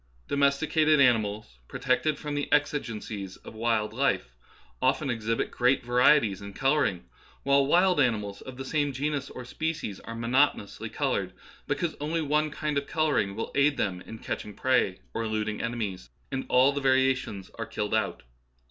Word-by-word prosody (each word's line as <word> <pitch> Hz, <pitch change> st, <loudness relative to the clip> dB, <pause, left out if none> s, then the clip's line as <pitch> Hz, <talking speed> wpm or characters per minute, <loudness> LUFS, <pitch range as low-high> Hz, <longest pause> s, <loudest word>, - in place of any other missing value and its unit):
Domesticated 150 Hz, +2 st, +3 dB
animals, 110 Hz, -, +2 dB
pro -, -, -7 dB
tected 155 Hz, -2 st, +1 dB
from 150 Hz, -1 st, -5 dB
the 145 Hz, 0 st, -3 dB
exigencies 110 Hz, -9 st, -1 dB
of -, -, -12 dB
wild 110 Hz, -1 st, 0 dB
life, 110 Hz, -, 0 dB, 0.5 s
often 130 Hz, +2 st, +2 dB
exhibit 115 Hz, -1 st, -1 dB
great 125 Hz, +2 st, +2 dB
varieties 120 Hz, -4 st, +4 dB
in 100 Hz, 0 st, -8 dB
colouring, 135 Hz, -, +1 dB, 0.4 s
while 140 Hz, 0 st, +3 dB
wild 180 Hz, +2 st, +4 dB
animals 105 Hz, -6 st, 0 dB
of 130 Hz, -1 st, -9 dB
the 135 Hz, -, -6 dB
same 145 Hz, 0 st, 0 dB
genus 140 Hz, +1 st, -2 dB
or 125 Hz, -, -8 dB
species 155 Hz, -8 st, -3 dB
are 115 Hz, -, -8 dB
monoto 125 Hz, +5 st, +3 dB
nously 100 Hz, -, -8 dB
coloured, -, -, -1 dB, 0.3 s
because 170 Hz, -3 st, -1 dB
only 160 Hz, +3 st, -1 dB
one 150 Hz, 0 st, +1 dB
kind 150 Hz, -1 st, -1 dB
of 140 Hz, -, -10 dB
colour 155 Hz, -1 st, +1 dB
ing 100 Hz, 0 st, -2 dB
will 115 Hz, -, -4 dB
aid 140 Hz, +1 st, +3 dB
them 90 Hz, -3 st, -1 dB
in 115 Hz, -, -9 dB
catching 105 Hz, -2 st, -5 dB
prey 125 Hz, -8 st, +2 dB, 0.2 s
or -, -, -2 dB
eluding 110 Hz, -1 st, -2 dB
ene 115 Hz, +1 st, -2 dB
mies, 95 Hz, -, -4 dB, 0.2 s
and 135 Hz, 0 st, -3 dB
all 130 Hz, +2 st, +5 dB
the 140 Hz, -, -2 dB
variations 130 Hz, -7 st, +1 dB
are -, -, -3 dB
killed 105 Hz, 0 st, -3 dB
out. 110 Hz, -, 0 dB
130 Hz, 170 wpm, -28 LUFS, 110-145 Hz, 0.5 s, all